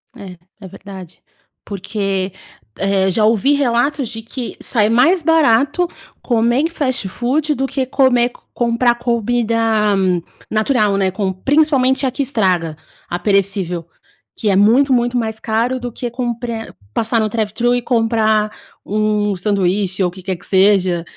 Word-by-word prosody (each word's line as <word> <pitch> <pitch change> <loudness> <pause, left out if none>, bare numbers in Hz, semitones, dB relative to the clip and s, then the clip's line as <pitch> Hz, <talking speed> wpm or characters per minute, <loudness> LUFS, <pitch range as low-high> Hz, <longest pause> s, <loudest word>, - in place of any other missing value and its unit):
É, 190 -6 -10 0.2
é 190 - -8
verdade, 190 -2 -11 0.4
porque, 195 -1 -3 0.5
eh, 195 -1 +1
já 215 +3 +2
ouvi 230 +6 +3
relatos 275 0 +1
de 225 -1 -7
que 240 +2 -7
sai 215 -3 +1
mais 320 +10 +4
barato 315 +1 +3 0.3
comer 240 +1 +1
em 325 - 0
fast 260 - -2
food 285 +8 0
do 270 +1 -1
que 265 -1 -2
come 250 -2 +3 0.2
comprar 240 0 +1
comida 235 -1 0 0.9
natural, 215 -2 +1
né, 190 -1 +1
com 190 -1 -2
principalmente 270 - +2
a 255 - 0
que 275 +2 -2
estraga, 185 - 0 0.3
a 175 - -3
perecível, 195 -4 0 0.5
que 210 - -1
é 190 - +3
muito, 245 +7 +4
muito 245 0 +1
mais 220 -2 -2
caro 235 +3 -1
do 245 -1 -5
que 240 +1 -5
comprar 235 -2 -4 0.2
passar 225 +1 0
no 215 - +1
drive-thru 225 +3 0
e 245 - 0
comprar 220 -3 +1 0.3
um 210 -1 0
sanduíche 190 0 0
ou 180 - +2
o - - -11
que 185 0 -13
quer 190 -2 -3
que 175 - -18
seja, 190 -3 +3
225 Hz, 150 wpm, -17 LUFS, 195-250 Hz, 0.9 s, mais